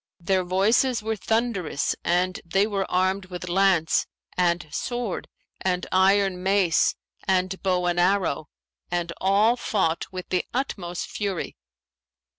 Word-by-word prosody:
Their 185 +2 +1
voices 215 +7 +2
were 220 0 -1
thunderous 220 -8 -1
and 180 +1 +1
they 195 +4 +2
were 200 -3 -2
armed 185 +1 +1
with 180 0 -7
lance 180 -2 +3 0.3
and 175 -2 +1
sword 240 -5 -3 0.3
and 180 -1 -1
iron 190 0 +3
mace 190 -3 +3 0.3
and 185 0 +1
bow 180 -2 +1
and 175 0 +1
arrow, 175 -5 +1 0.4
and 175 -1 -2
all 205 +5 +4
fought 190 -9 0
with 185 -1 -7
the 180 -1 +1
utmost 180 -10 -3
fury. 200 -4 -3
185 Hz, 125 wpm, -25 LUFS, 180-200 Hz, 0.4 s, all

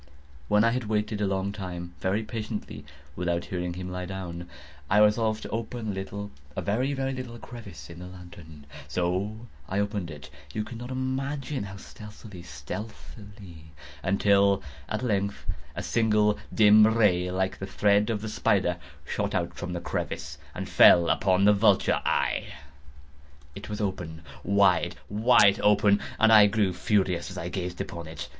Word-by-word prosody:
When 105 +4 +4
I 115 - +4
had 125 -1 -2
waited 105 0 -1
a 105 - +2
long 95 0 -1
time, 90 -3 -6
very 100 +4 0
patiently, 110 -1 -6 0.3
without 85 -1 -1
hearing 90 -1 -3
him 90 0 -6
lie 90 0 -4
down, 90 -2 -6 0.4
I 100 - +3
resolved 110 +1 +3
to - - -6
open 115 0 -4
a - - 0
little—a 95 -7 -7
very, 125 +7 0
very 135 0 -2
little 125 -2 -6
crevice 105 - -10
in 85 0 -11
the 90 - -8
lantern. 85 -5 -12 0.2
So 95 +8 -2 0.2
I 95 - -2
opened 100 -3 -1
it—you 70 +5 -8
cannot 120 +2 -8
imagine 135 0 -3
how 100 0 -8
stealthily, 105 -2 -11
stealthily—until, 100 - -2 0.3
at 110 +3 -2
length 100 -4 -1 0.3
a - - -4
simple 105 -2 +2
dim 105 0 +7
ray, 100 -6 +3
like 95 +1 -1
the 95 - -5
thread 100 +2 +2
of 110 -3 -1
the - - -3
spider, 100 -5 +1 0.3
shot - - -2 0.2
from 90 - -6
out - - -4
the 85 - -3
crevice - - -4 0.2
and - - -4
fell 85 - +7
full - - -1
upon 95 0 +2
the 105 - +7
vulture 100 -1 +3
eye. - - 0 1.1
It 100 - -9
was 105 - -4
open—wide, 90 0 0 0.2
wide 105 -2 +5
open—and 105 +2 +3
I 105 -1 +9
grew 100 -2 +1
furious 90 -2 0
as - - -8
I 85 - -4
gazed 90 -1 -4
upon 85 -2 -5
it. 80 -1 -7
100 Hz, 155 wpm, -27 LUFS, 90-110 Hz, 1.1 s, I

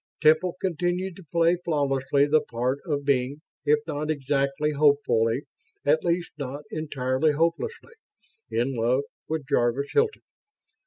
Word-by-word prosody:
Temple 160 +4 +3
continued 180 +1 -1
to 190 - -13
play 170 +1 +3
flawlessly 140 -3 +1
the 150 +1 +3
part 125 +4 -2
of 145 -3 -1
being 135 +1 +1 0.3
if 150 +1 +5
not 150 -1 -3
exactly 140 0 0
hopefully, 140 -4 +2 0.4
at 155 +2 +3
least 175 0 0
not 140 +1 -5
entirely 145 -1 0
hopelessly 170 - -1 0.6
in 125 +4 0
love 125 +3 +1 0.2
with 155 -2 -3
Jarvis 120 +4 +1
Hilton. 445 0 +1
145 Hz, 125 wpm, -26 LUFS, 135-165 Hz, 0.6 s, if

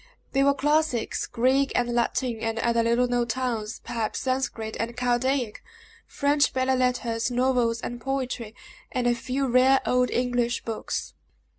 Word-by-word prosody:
They 275 0 +2
were 280 0 +4
classics, 295 -4 0
Greek 260 +3 +2
and 240 -1 +1
Latin, 240 0 0
and 225 0 -2
other 235 0 +2
little 235 +2 +2
known 245 -1 0
tongues 230 -3 -3
perhaps 230 -2 -3
Sanscrit 255 -4 -2
and 235 +1 -3
Chaldaic, 245 -1 0 0.5
French 285 0 +2
belles 260 0 +1
lettres, 245 -2 0
novels, 245 -2 +1
and 240 0 -5
poetry, 255 -4 -3 0.4
and 250 -1 -1
a 240 - +4
few 255 +3 -2
rare 260 +2 +5
old 250 0 +2
English 245 -1 0
books. 225 -2 -4
245 Hz, 145 wpm, -26 LUFS, 235-260 Hz, 0.5 s, rare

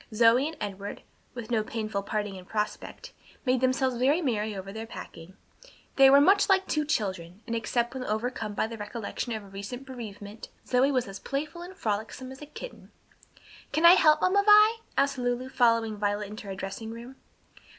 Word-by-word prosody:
Zoe 230 +5 +4
and 320 - -7
Edward, 200 -1 -6 0.3
with 240 -1 -7
no 220 -2 +2
painful 215 -2 -3
parting 205 0 -3
in 185 -1 -10
prospect, 215 - -4 0.3
made 255 -1 +2
themselves 260 -1 +1
very 275 +7 +3
merry 220 - -1
over 195 0 -7
their 220 +1 -6
packing. 175 -4 -10 0.6
They 270 -1 +8
were 280 +1 +8
much 395 +8 +4
like 385 -1 +4
two 305 -1 0
children, 190 - -3
and 235 -1 -3
except 235 +1 -1
when 260 -1 -4
overcome 220 -1 -3
by - - +1
the 225 0 -7
recollection 215 +3 -5
of 220 -1 -5
her - - -13
recent 200 +7 -7
bereavement, 215 -4 -9 0.2
Zoe 260 +3 +3
was 255 -5 0
as 195 0 -8
playful 305 +5 -4
and 365 +2 -10
frolicsome 220 +5 -3
as 265 - -11
a 295 - -9
kitten. - - -10 0.8
"Can 320 +2 +2
I 340 - +11
help, 310 -4 +5
Mamma 395 +2 +4
Vi?" 425 +2 +7 0.2
asked 275 -2 +2
Lulu, 245 +1 -1
following 230 -4 +2
Violet 205 0 -2
into 215 -1 -9
her 195 - -5
dressing 195 +4 -6
room. 235 +3 -9
235 Hz, 185 wpm, -28 LUFS, 210-270 Hz, 0.8 s, I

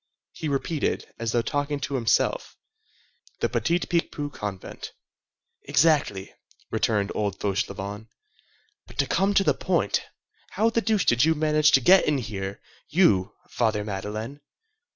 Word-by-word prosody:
He 160 - -5
repeated, 140 +2 -2
as 115 -1 -2
though 120 0 +1
talking 145 +2 -2
to 140 - -4
himself:— 120 -4 0 0.8
"The - - 0
Petit 170 +1 +1
Picpus 150 -4 -2
convent." 100 -3 -7 0.7
"Exactly," 145 -12 +2 0.4
returned 105 -2 0
old 100 -3 -2
Fauchelevent. 100 +1 -3 0.8
"But - - -15
to - - +2
come 195 +1 +1
to 195 - +5
the - - +3
point, - - 0 0.5
how 225 +1 +2
the 230 - +1
deuce 220 -3 +1
did 120 +1 +4
you 160 +1 +3
manage 155 0 +3
to 135 - +6
get 185 +9 +6
in 150 -1 +2
here, 100 -5 -5 0.3
you, 105 - +3 0.2
Father 110 -3 0
Madeleine? 105 +7 -5
125 Hz, 135 wpm, -25 LUFS, 105-155 Hz, 0.8 s, to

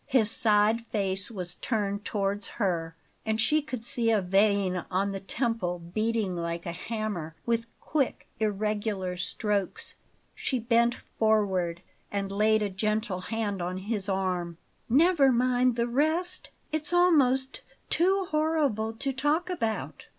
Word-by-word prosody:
His 240 -6 +4
side 220 -1 +3
face 195 -2 -1
was 180 -6 -4
turned 205 -2 -2
towards 200 0 -1
her, 170 -6 -1 0.3
and 220 0 -1
she 300 +8 +3
could 255 -6 -6
see 235 -1 +2
a 220 -2 +4
vein 195 -1 +2
on 195 +2 0
the 195 - -4
temple 195 -4 -1
beating 210 +3 -1
like 170 0 -3
a 170 - -2
hammer, 190 -4 -4
with 230 0 0
quick, 285 -5 -1
irregular 210 -3 -1
strokes. 200 +2 -1 0.4
She 260 - -2
bent 235 0 +2 0.2
forward 190 -6 +1 0.3
and 200 -1 -2
laid 215 +2 +3
a 205 - 0
gentle 215 0 -1
hand 205 -2 -2
on 180 +1 -3
his 200 0 -3
arm. 180 -3 -1 0.3
"Never 290 +1 +5
mind 250 0 +2
the 235 0 0
rest; 315 +8 0 0.2
it's 310 +2 -2
almost 275 -7 +3 0.3
too 380 +3 +3
horrible 300 -9 +1
to 270 +4 -2
talk 295 +7 0
about." 225 -11 -3
215 Hz, 135 wpm, -28 LUFS, 195-250 Hz, 0.4 s, Never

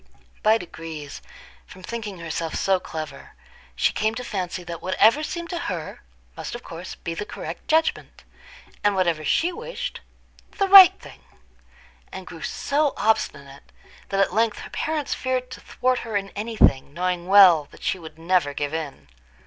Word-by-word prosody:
By 220 +1 +4
degrees, 165 -6 -8 0.5
from 185 - -14
thinking 215 -3 -6
herself 165 -1 -4
so 190 -1 +2
clever, 155 -5 -8 0.4
she - - +2
came 220 +1 0
to 250 - -5
fancy 185 -5 -4
that 170 -1 -7
whatever 220 +9 +4
seemed 340 +2 -5
to 345 - -3
her, - - -5 0.3
must - - -6
of 240 - -8
course 170 +2 -8
be 165 - -5
the 165 - -4
correct - - -8
judgment, 320 0 0 0.6
and 205 -1 +3
whatever 170 -4 +1
she 345 - +1
wished, - - -6 0.6
the 395 - +2
right 385 -2 +10
thing; - - -14 0.9
and - - -8
grew - - -10
so 290 0 0
obstinate, 140 -10 -1 0.4
that 195 - -1
at 195 - +2
length 225 0 +1
her - - -10
parents 305 -2 -2
feared 255 -1 -2
to - - -8
thwart 255 0 0
her 225 -3 -2
in 195 0 -4
any 220 +2 -5
thing, 135 -3 +3
knowing 180 0 -2
well 185 -6 +7
that - - -16
she 190 - -1
would 160 -2 -11
never 165 -4 +1
give 145 +1 -3
in. 155 - -5
195 Hz, 165 wpm, -24 LUFS, 165-250 Hz, 0.9 s, right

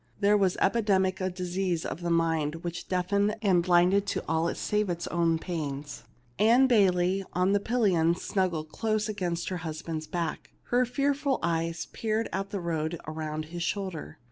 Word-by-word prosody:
There 205 0 +4
was 195 -3 +2
epidemic 190 -3 +2
a 185 - 0
dis 180 -1 -5
ease 180 -4 0
of - - -5
the 175 - -2
mind 165 -1 0
which 170 -1 -5
deafened 200 +3 +1
and 185 -4 +4
blinded 180 +3 +3
to - - -2
all 160 +1 +1
save 210 -1 0
its 170 -1 -2
own 170 -1 +2
pains. 150 -5 -5 0.3
Ann 235 +5 +6
Bayley 195 -5 +3
on 180 +2 +2
the 205 - +3
pillion 195 -8 +2
snuggled 175 -5 -2
closely 215 -1 -1
against 175 -4 -2
her 185 - -2
husband's 160 -1 -5
back; 170 -3 -4 0.2
her 250 +1 +3
fearful 275 +2 0
eves 165 0 -1
peered 220 0 -2
at 195 +1 -2
the 200 - -3
road 165 -1 -2
around 155 0 -4
his 175 - -4
shoulder. 185 -2 -3
180 Hz, 170 wpm, -28 LUFS, 165-200 Hz, 0.3 s, Ann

